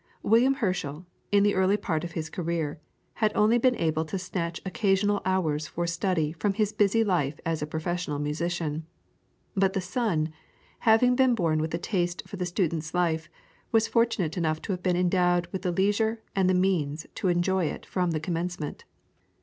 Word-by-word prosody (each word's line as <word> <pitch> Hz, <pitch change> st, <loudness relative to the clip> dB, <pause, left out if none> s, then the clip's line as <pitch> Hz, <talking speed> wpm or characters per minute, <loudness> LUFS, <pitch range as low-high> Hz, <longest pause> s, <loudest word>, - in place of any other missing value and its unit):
William 245 Hz, +5 st, +4 dB
Herschel, 180 Hz, -, -2 dB, 0.3 s
in 200 Hz, 0 st, +5 dB
the 205 Hz, 0 st, +3 dB
early 190 Hz, +2 st, +3 dB
part 175 Hz, -6 st, -2 dB
of 170 Hz, -1 st, -6 dB
his 160 Hz, -1 st, -3 dB
career, 165 Hz, -4 st, -3 dB, 0.4 s
had 215 Hz, -1 st, +4 dB
only 220 Hz, +3 st, +4 dB
been 250 Hz, +1 st, +3 dB
able 160 Hz, -3 st, 0 dB
to 195 Hz, -, -3 dB
snatch 175 Hz, -2 st, -3 dB
occasional 200 Hz, 0 st, +1 dB
hours 160 Hz, -5 st, 0 dB
for 175 Hz, -, -3 dB
study 170 Hz, -2 st, 0 dB
from 195 Hz, +4 st, -1 dB
his 210 Hz, -1 st, 0 dB
busy 210 Hz, +2 st, +3 dB
life 160 Hz, -8 st, 0 dB
as 165 Hz, -2 st, -1 dB
a 150 Hz, -, -2 dB
professional 160 Hz, 0 st, -2 dB
musician. 155 Hz, +1 st, -2 dB, 0.7 s
But 190 Hz, -1 st, +2 dB
the 195 Hz, -, 0 dB
son, 180 Hz, -5 st, -1 dB, 0.6 s
having 245 Hz, +3 st, +5 dB
been 260 Hz, -2 st, +4 dB
born 165 Hz, -6 st, +1 dB
with 160 Hz, +1 st, -2 dB
a -, -, 0 dB
taste 175 Hz, -1 st, -1 dB
for 200 Hz, -, -8 dB
the 180 Hz, -1 st, -2 dB
student's 165 Hz, -3 st, -1 dB
life, 165 Hz, -3 st, 0 dB, 0.4 s
was 225 Hz, -1 st, +3 dB
fortunate 225 Hz, -8 st, +1 dB
enough 155 Hz, -2 st, 0 dB
to -, -, -3 dB
have 180 Hz, -1 st, -3 dB
been 180 Hz, -1 st, +1 dB
endowed 175 Hz, -1 st, +2 dB
with 190 Hz, -, -4 dB
the 180 Hz, -1 st, 0 dB
leisure 215 Hz, +5 st, +1 dB
and 190 Hz, -1 st, +3 dB
the 185 Hz, -, +3 dB
means 165 Hz, -5 st, 0 dB
to -, -, -2 dB
enjoy 180 Hz, +1 st, +2 dB
it -, -, -4 dB
from 180 Hz, -2 st, -1 dB
the 160 Hz, -2 st, -1 dB
commencement. 170 Hz, -1 st, -4 dB
180 Hz, 180 wpm, -27 LUFS, 160-200 Hz, 0.7 s, in